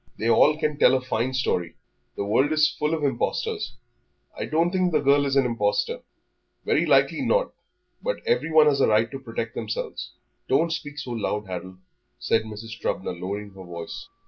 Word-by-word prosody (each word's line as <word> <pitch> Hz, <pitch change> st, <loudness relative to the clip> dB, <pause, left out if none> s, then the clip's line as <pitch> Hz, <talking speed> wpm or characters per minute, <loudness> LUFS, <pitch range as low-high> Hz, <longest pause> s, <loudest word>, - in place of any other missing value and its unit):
They 115 Hz, +1 st, +1 dB
all 150 Hz, +5 st, +5 dB
can 150 Hz, -2 st, -1 dB
tell 130 Hz, -, +6 dB
a -, -, +2 dB
fine 125 Hz, 0 st, -1 dB
story; 90 Hz, -10 st, -1 dB, 0.4 s
the 100 Hz, -, -3 dB
world 130 Hz, +8 st, +2 dB
is 155 Hz, 0 st, +4 dB
full 150 Hz, +2 st, +1 dB
of 155 Hz, -, -5 dB
impostors." 425 Hz, -, -1 dB, 0.6 s
"I -, -, -3 dB
don't 165 Hz, +3 st, +1 dB
think 185 Hz, -1 st, +1 dB
the 155 Hz, -, +3 dB
girl 140 Hz, 0 st, +3 dB
is 135 Hz, -, 0 dB
an 135 Hz, -2 st, +4 dB
impostor." 475 Hz, -, 0 dB, 0.6 s
"Very -, -, +2 dB
likely -, -, +3 dB
not, -, -, +1 dB, 0.5 s
but -, -, -1 dB
everyone 160 Hz, -, +4 dB
has 140 Hz, -2 st, +3 dB
a -, -, +5 dB
right 110 Hz, +1 st, +3 dB
to 135 Hz, -, -6 dB
protect 115 Hz, -2 st, -5 dB
themselves." 110 Hz, -2 st, -5 dB, 0.4 s
"Don't 165 Hz, +5 st, +2 dB
speak 150 Hz, -2 st, -6 dB
so 130 Hz, -4 st, -5 dB
loud, 105 Hz, -2 st, -2 dB
Harold," 95 Hz, 0 st, -7 dB, 0.4 s
said 110 Hz, 0 st, +1 dB
Mrs. 110 Hz, +1 st, -8 dB
Trubner, 95 Hz, -, -2 dB
lowering 100 Hz, +4 st, -5 dB
her 95 Hz, -1 st, -11 dB
voice. 85 Hz, -2 st, -7 dB
130 Hz, 180 wpm, -25 LUFS, 110-155 Hz, 0.6 s, tell